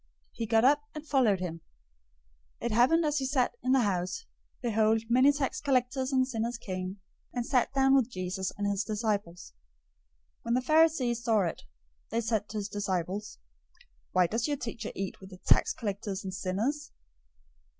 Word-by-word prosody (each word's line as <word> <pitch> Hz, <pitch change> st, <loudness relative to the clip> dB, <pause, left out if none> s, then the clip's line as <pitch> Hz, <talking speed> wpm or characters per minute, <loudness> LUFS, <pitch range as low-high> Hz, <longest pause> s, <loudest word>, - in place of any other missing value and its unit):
He 230 Hz, -, -4 dB
got 225 Hz, +2 st, +4 dB
up 290 Hz, +2 st, +5 dB
and 305 Hz, 0 st, -7 dB
followed 240 Hz, -10 st, +3 dB
him. 165 Hz, -2 st, -4 dB, 1.0 s
009:010 -, -, -6 dB
It 235 Hz, -, 0 dB
happened 260 Hz, +9 st, +4 dB
as 300 Hz, -1 st, +1 dB
he 265 Hz, -, -1 dB
sat 260 Hz, -2 st, +1 dB
in 255 Hz, -, 0 dB
the 265 Hz, -1 st, +5 dB
house, 195 Hz, -, -1 dB, 0.3 s
behold, 220 Hz, -2 st, +2 dB
many 255 Hz, +4 st, +6 dB
tax 275 Hz, -2 st, -2 dB
collectors 260 Hz, -1 st, +1 dB
and 260 Hz, -1 st, +3 dB
sinners 235 Hz, -1 st, -2 dB
came 185 Hz, -2 st, -5 dB, 0.3 s
and 245 Hz, -1 st, -2 dB
sat 250 Hz, -2 st, +2 dB
down 270 Hz, 0 st, +4 dB
with 260 Hz, -3 st, +4 dB
Jesus 185 Hz, -2 st, -3 dB
and 205 Hz, -, -2 dB
his 200 Hz, 0 st, 0 dB
disciples. 210 Hz, -5 st, -3 dB, 0.9 s
009:011 -, -, -43 dB
When 235 Hz, -, 0 dB
the 255 Hz, -, +2 dB
Pharisees 285 Hz, -6 st, +3 dB
saw 220 Hz, -3 st, +3 dB
it, 170 Hz, -4 st, -2 dB, 0.5 s
they 230 Hz, -, 0 dB
said 220 Hz, -2 st, -1 dB
to 215 Hz, -, -5 dB
his 200 Hz, -1 st, -2 dB
disciples, 200 Hz, 0 st, -3 dB, 0.7 s
"Why 185 Hz, -1 st, +4 dB
does 225 Hz, -, -1 dB
your 290 Hz, -1 st, -1 dB
teacher 230 Hz, -4 st, -5 dB
eat 195 Hz, -1 st, -4 dB
with 190 Hz, -1 st, -12 dB
tax -, -, +4 dB
collectors 200 Hz, -3 st, -4 dB
and 190 Hz, -1 st, -5 dB
sinners?" 220 Hz, +11 st, -2 dB
225 Hz, 170 wpm, -29 LUFS, 200-260 Hz, 1.0 s, many